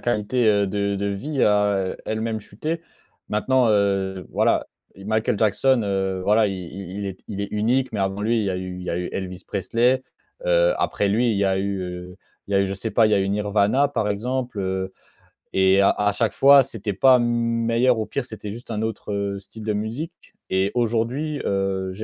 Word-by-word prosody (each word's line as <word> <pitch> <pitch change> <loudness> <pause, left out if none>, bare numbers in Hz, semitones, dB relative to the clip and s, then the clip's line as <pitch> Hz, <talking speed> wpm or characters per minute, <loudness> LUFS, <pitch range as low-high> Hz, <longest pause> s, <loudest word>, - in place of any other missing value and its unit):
qualité, 120 +1 0
heu, 100 -1 +3
de 100 0 -1
de 100 +1 -2
vie 130 +9 -1
a 105 -2 +2
elle-même 110 0 -2
chuté? 155 +11 -4 0.5
Maintenant, 125 +4 +2
heu, 95 -2 +1
voilà, - - +2 0.3
Michael 105 +2 -1
Jackson, 115 +4 +3
heu, 95 -2 -1
voilà, 105 0 +4
i - - -3
i 95 0 -7
il 100 - -3
est 95 -1 -6
il 100 -2 -4
est 100 - -1
unique, 120 +5 +1
mais 105 - -2
avant 95 +1 -1
lui 115 +3 +1
il - - -1
y 100 - 0
a 90 - -2
eu 90 0 -5
il - - -7
y 90 - -4
a - - -1
eu 90 - -3
Elvis 95 -1 -5
Presley, 115 +7 +1 0.4
heu. - - +4
Après 100 - 0
lui 115 +4 +2
il 105 - 0
y 100 - +2
a 95 -1 +2
eu, 100 0 -1
heu, 90 0 -7 0.3
il - - -4
y - - +2
a - - +4
eu - - 0
je 95 - -3
sais 110 +4 -4
pas, 115 0 +4
il - - 0
y - - +6
a - - +3
eu 95 - 0
Nirvana 105 +6 +2
par 115 -7 -1
exemple, 125 +3 -2
heu. 95 0 -2 0.6
Et 95 +1 +4
à 100 - +5
à 105 0 +1
chaque 115 +2 0
fois 140 0 +7
c'était 110 -5 -5
pas 130 +6 +5
meilleur 115 0 +1
ou 110 - -1
pire. 140 - -3
C'était 105 -4 -7
juste 120 +2 -9
un 105 -1 -2
autre, 110 -2 -4
heu, 100 -1 -2
style 110 +3 -12
de 105 - 0
musique. 115 +11 -4 0.4
Et 95 +1 +2
aujourd'hui, 120 +6 -1
heu, 95 -1 -1
j'ai 105 +4 -7
105 Hz, 220 wpm, -23 LUFS, 95-115 Hz, 0.6 s, fois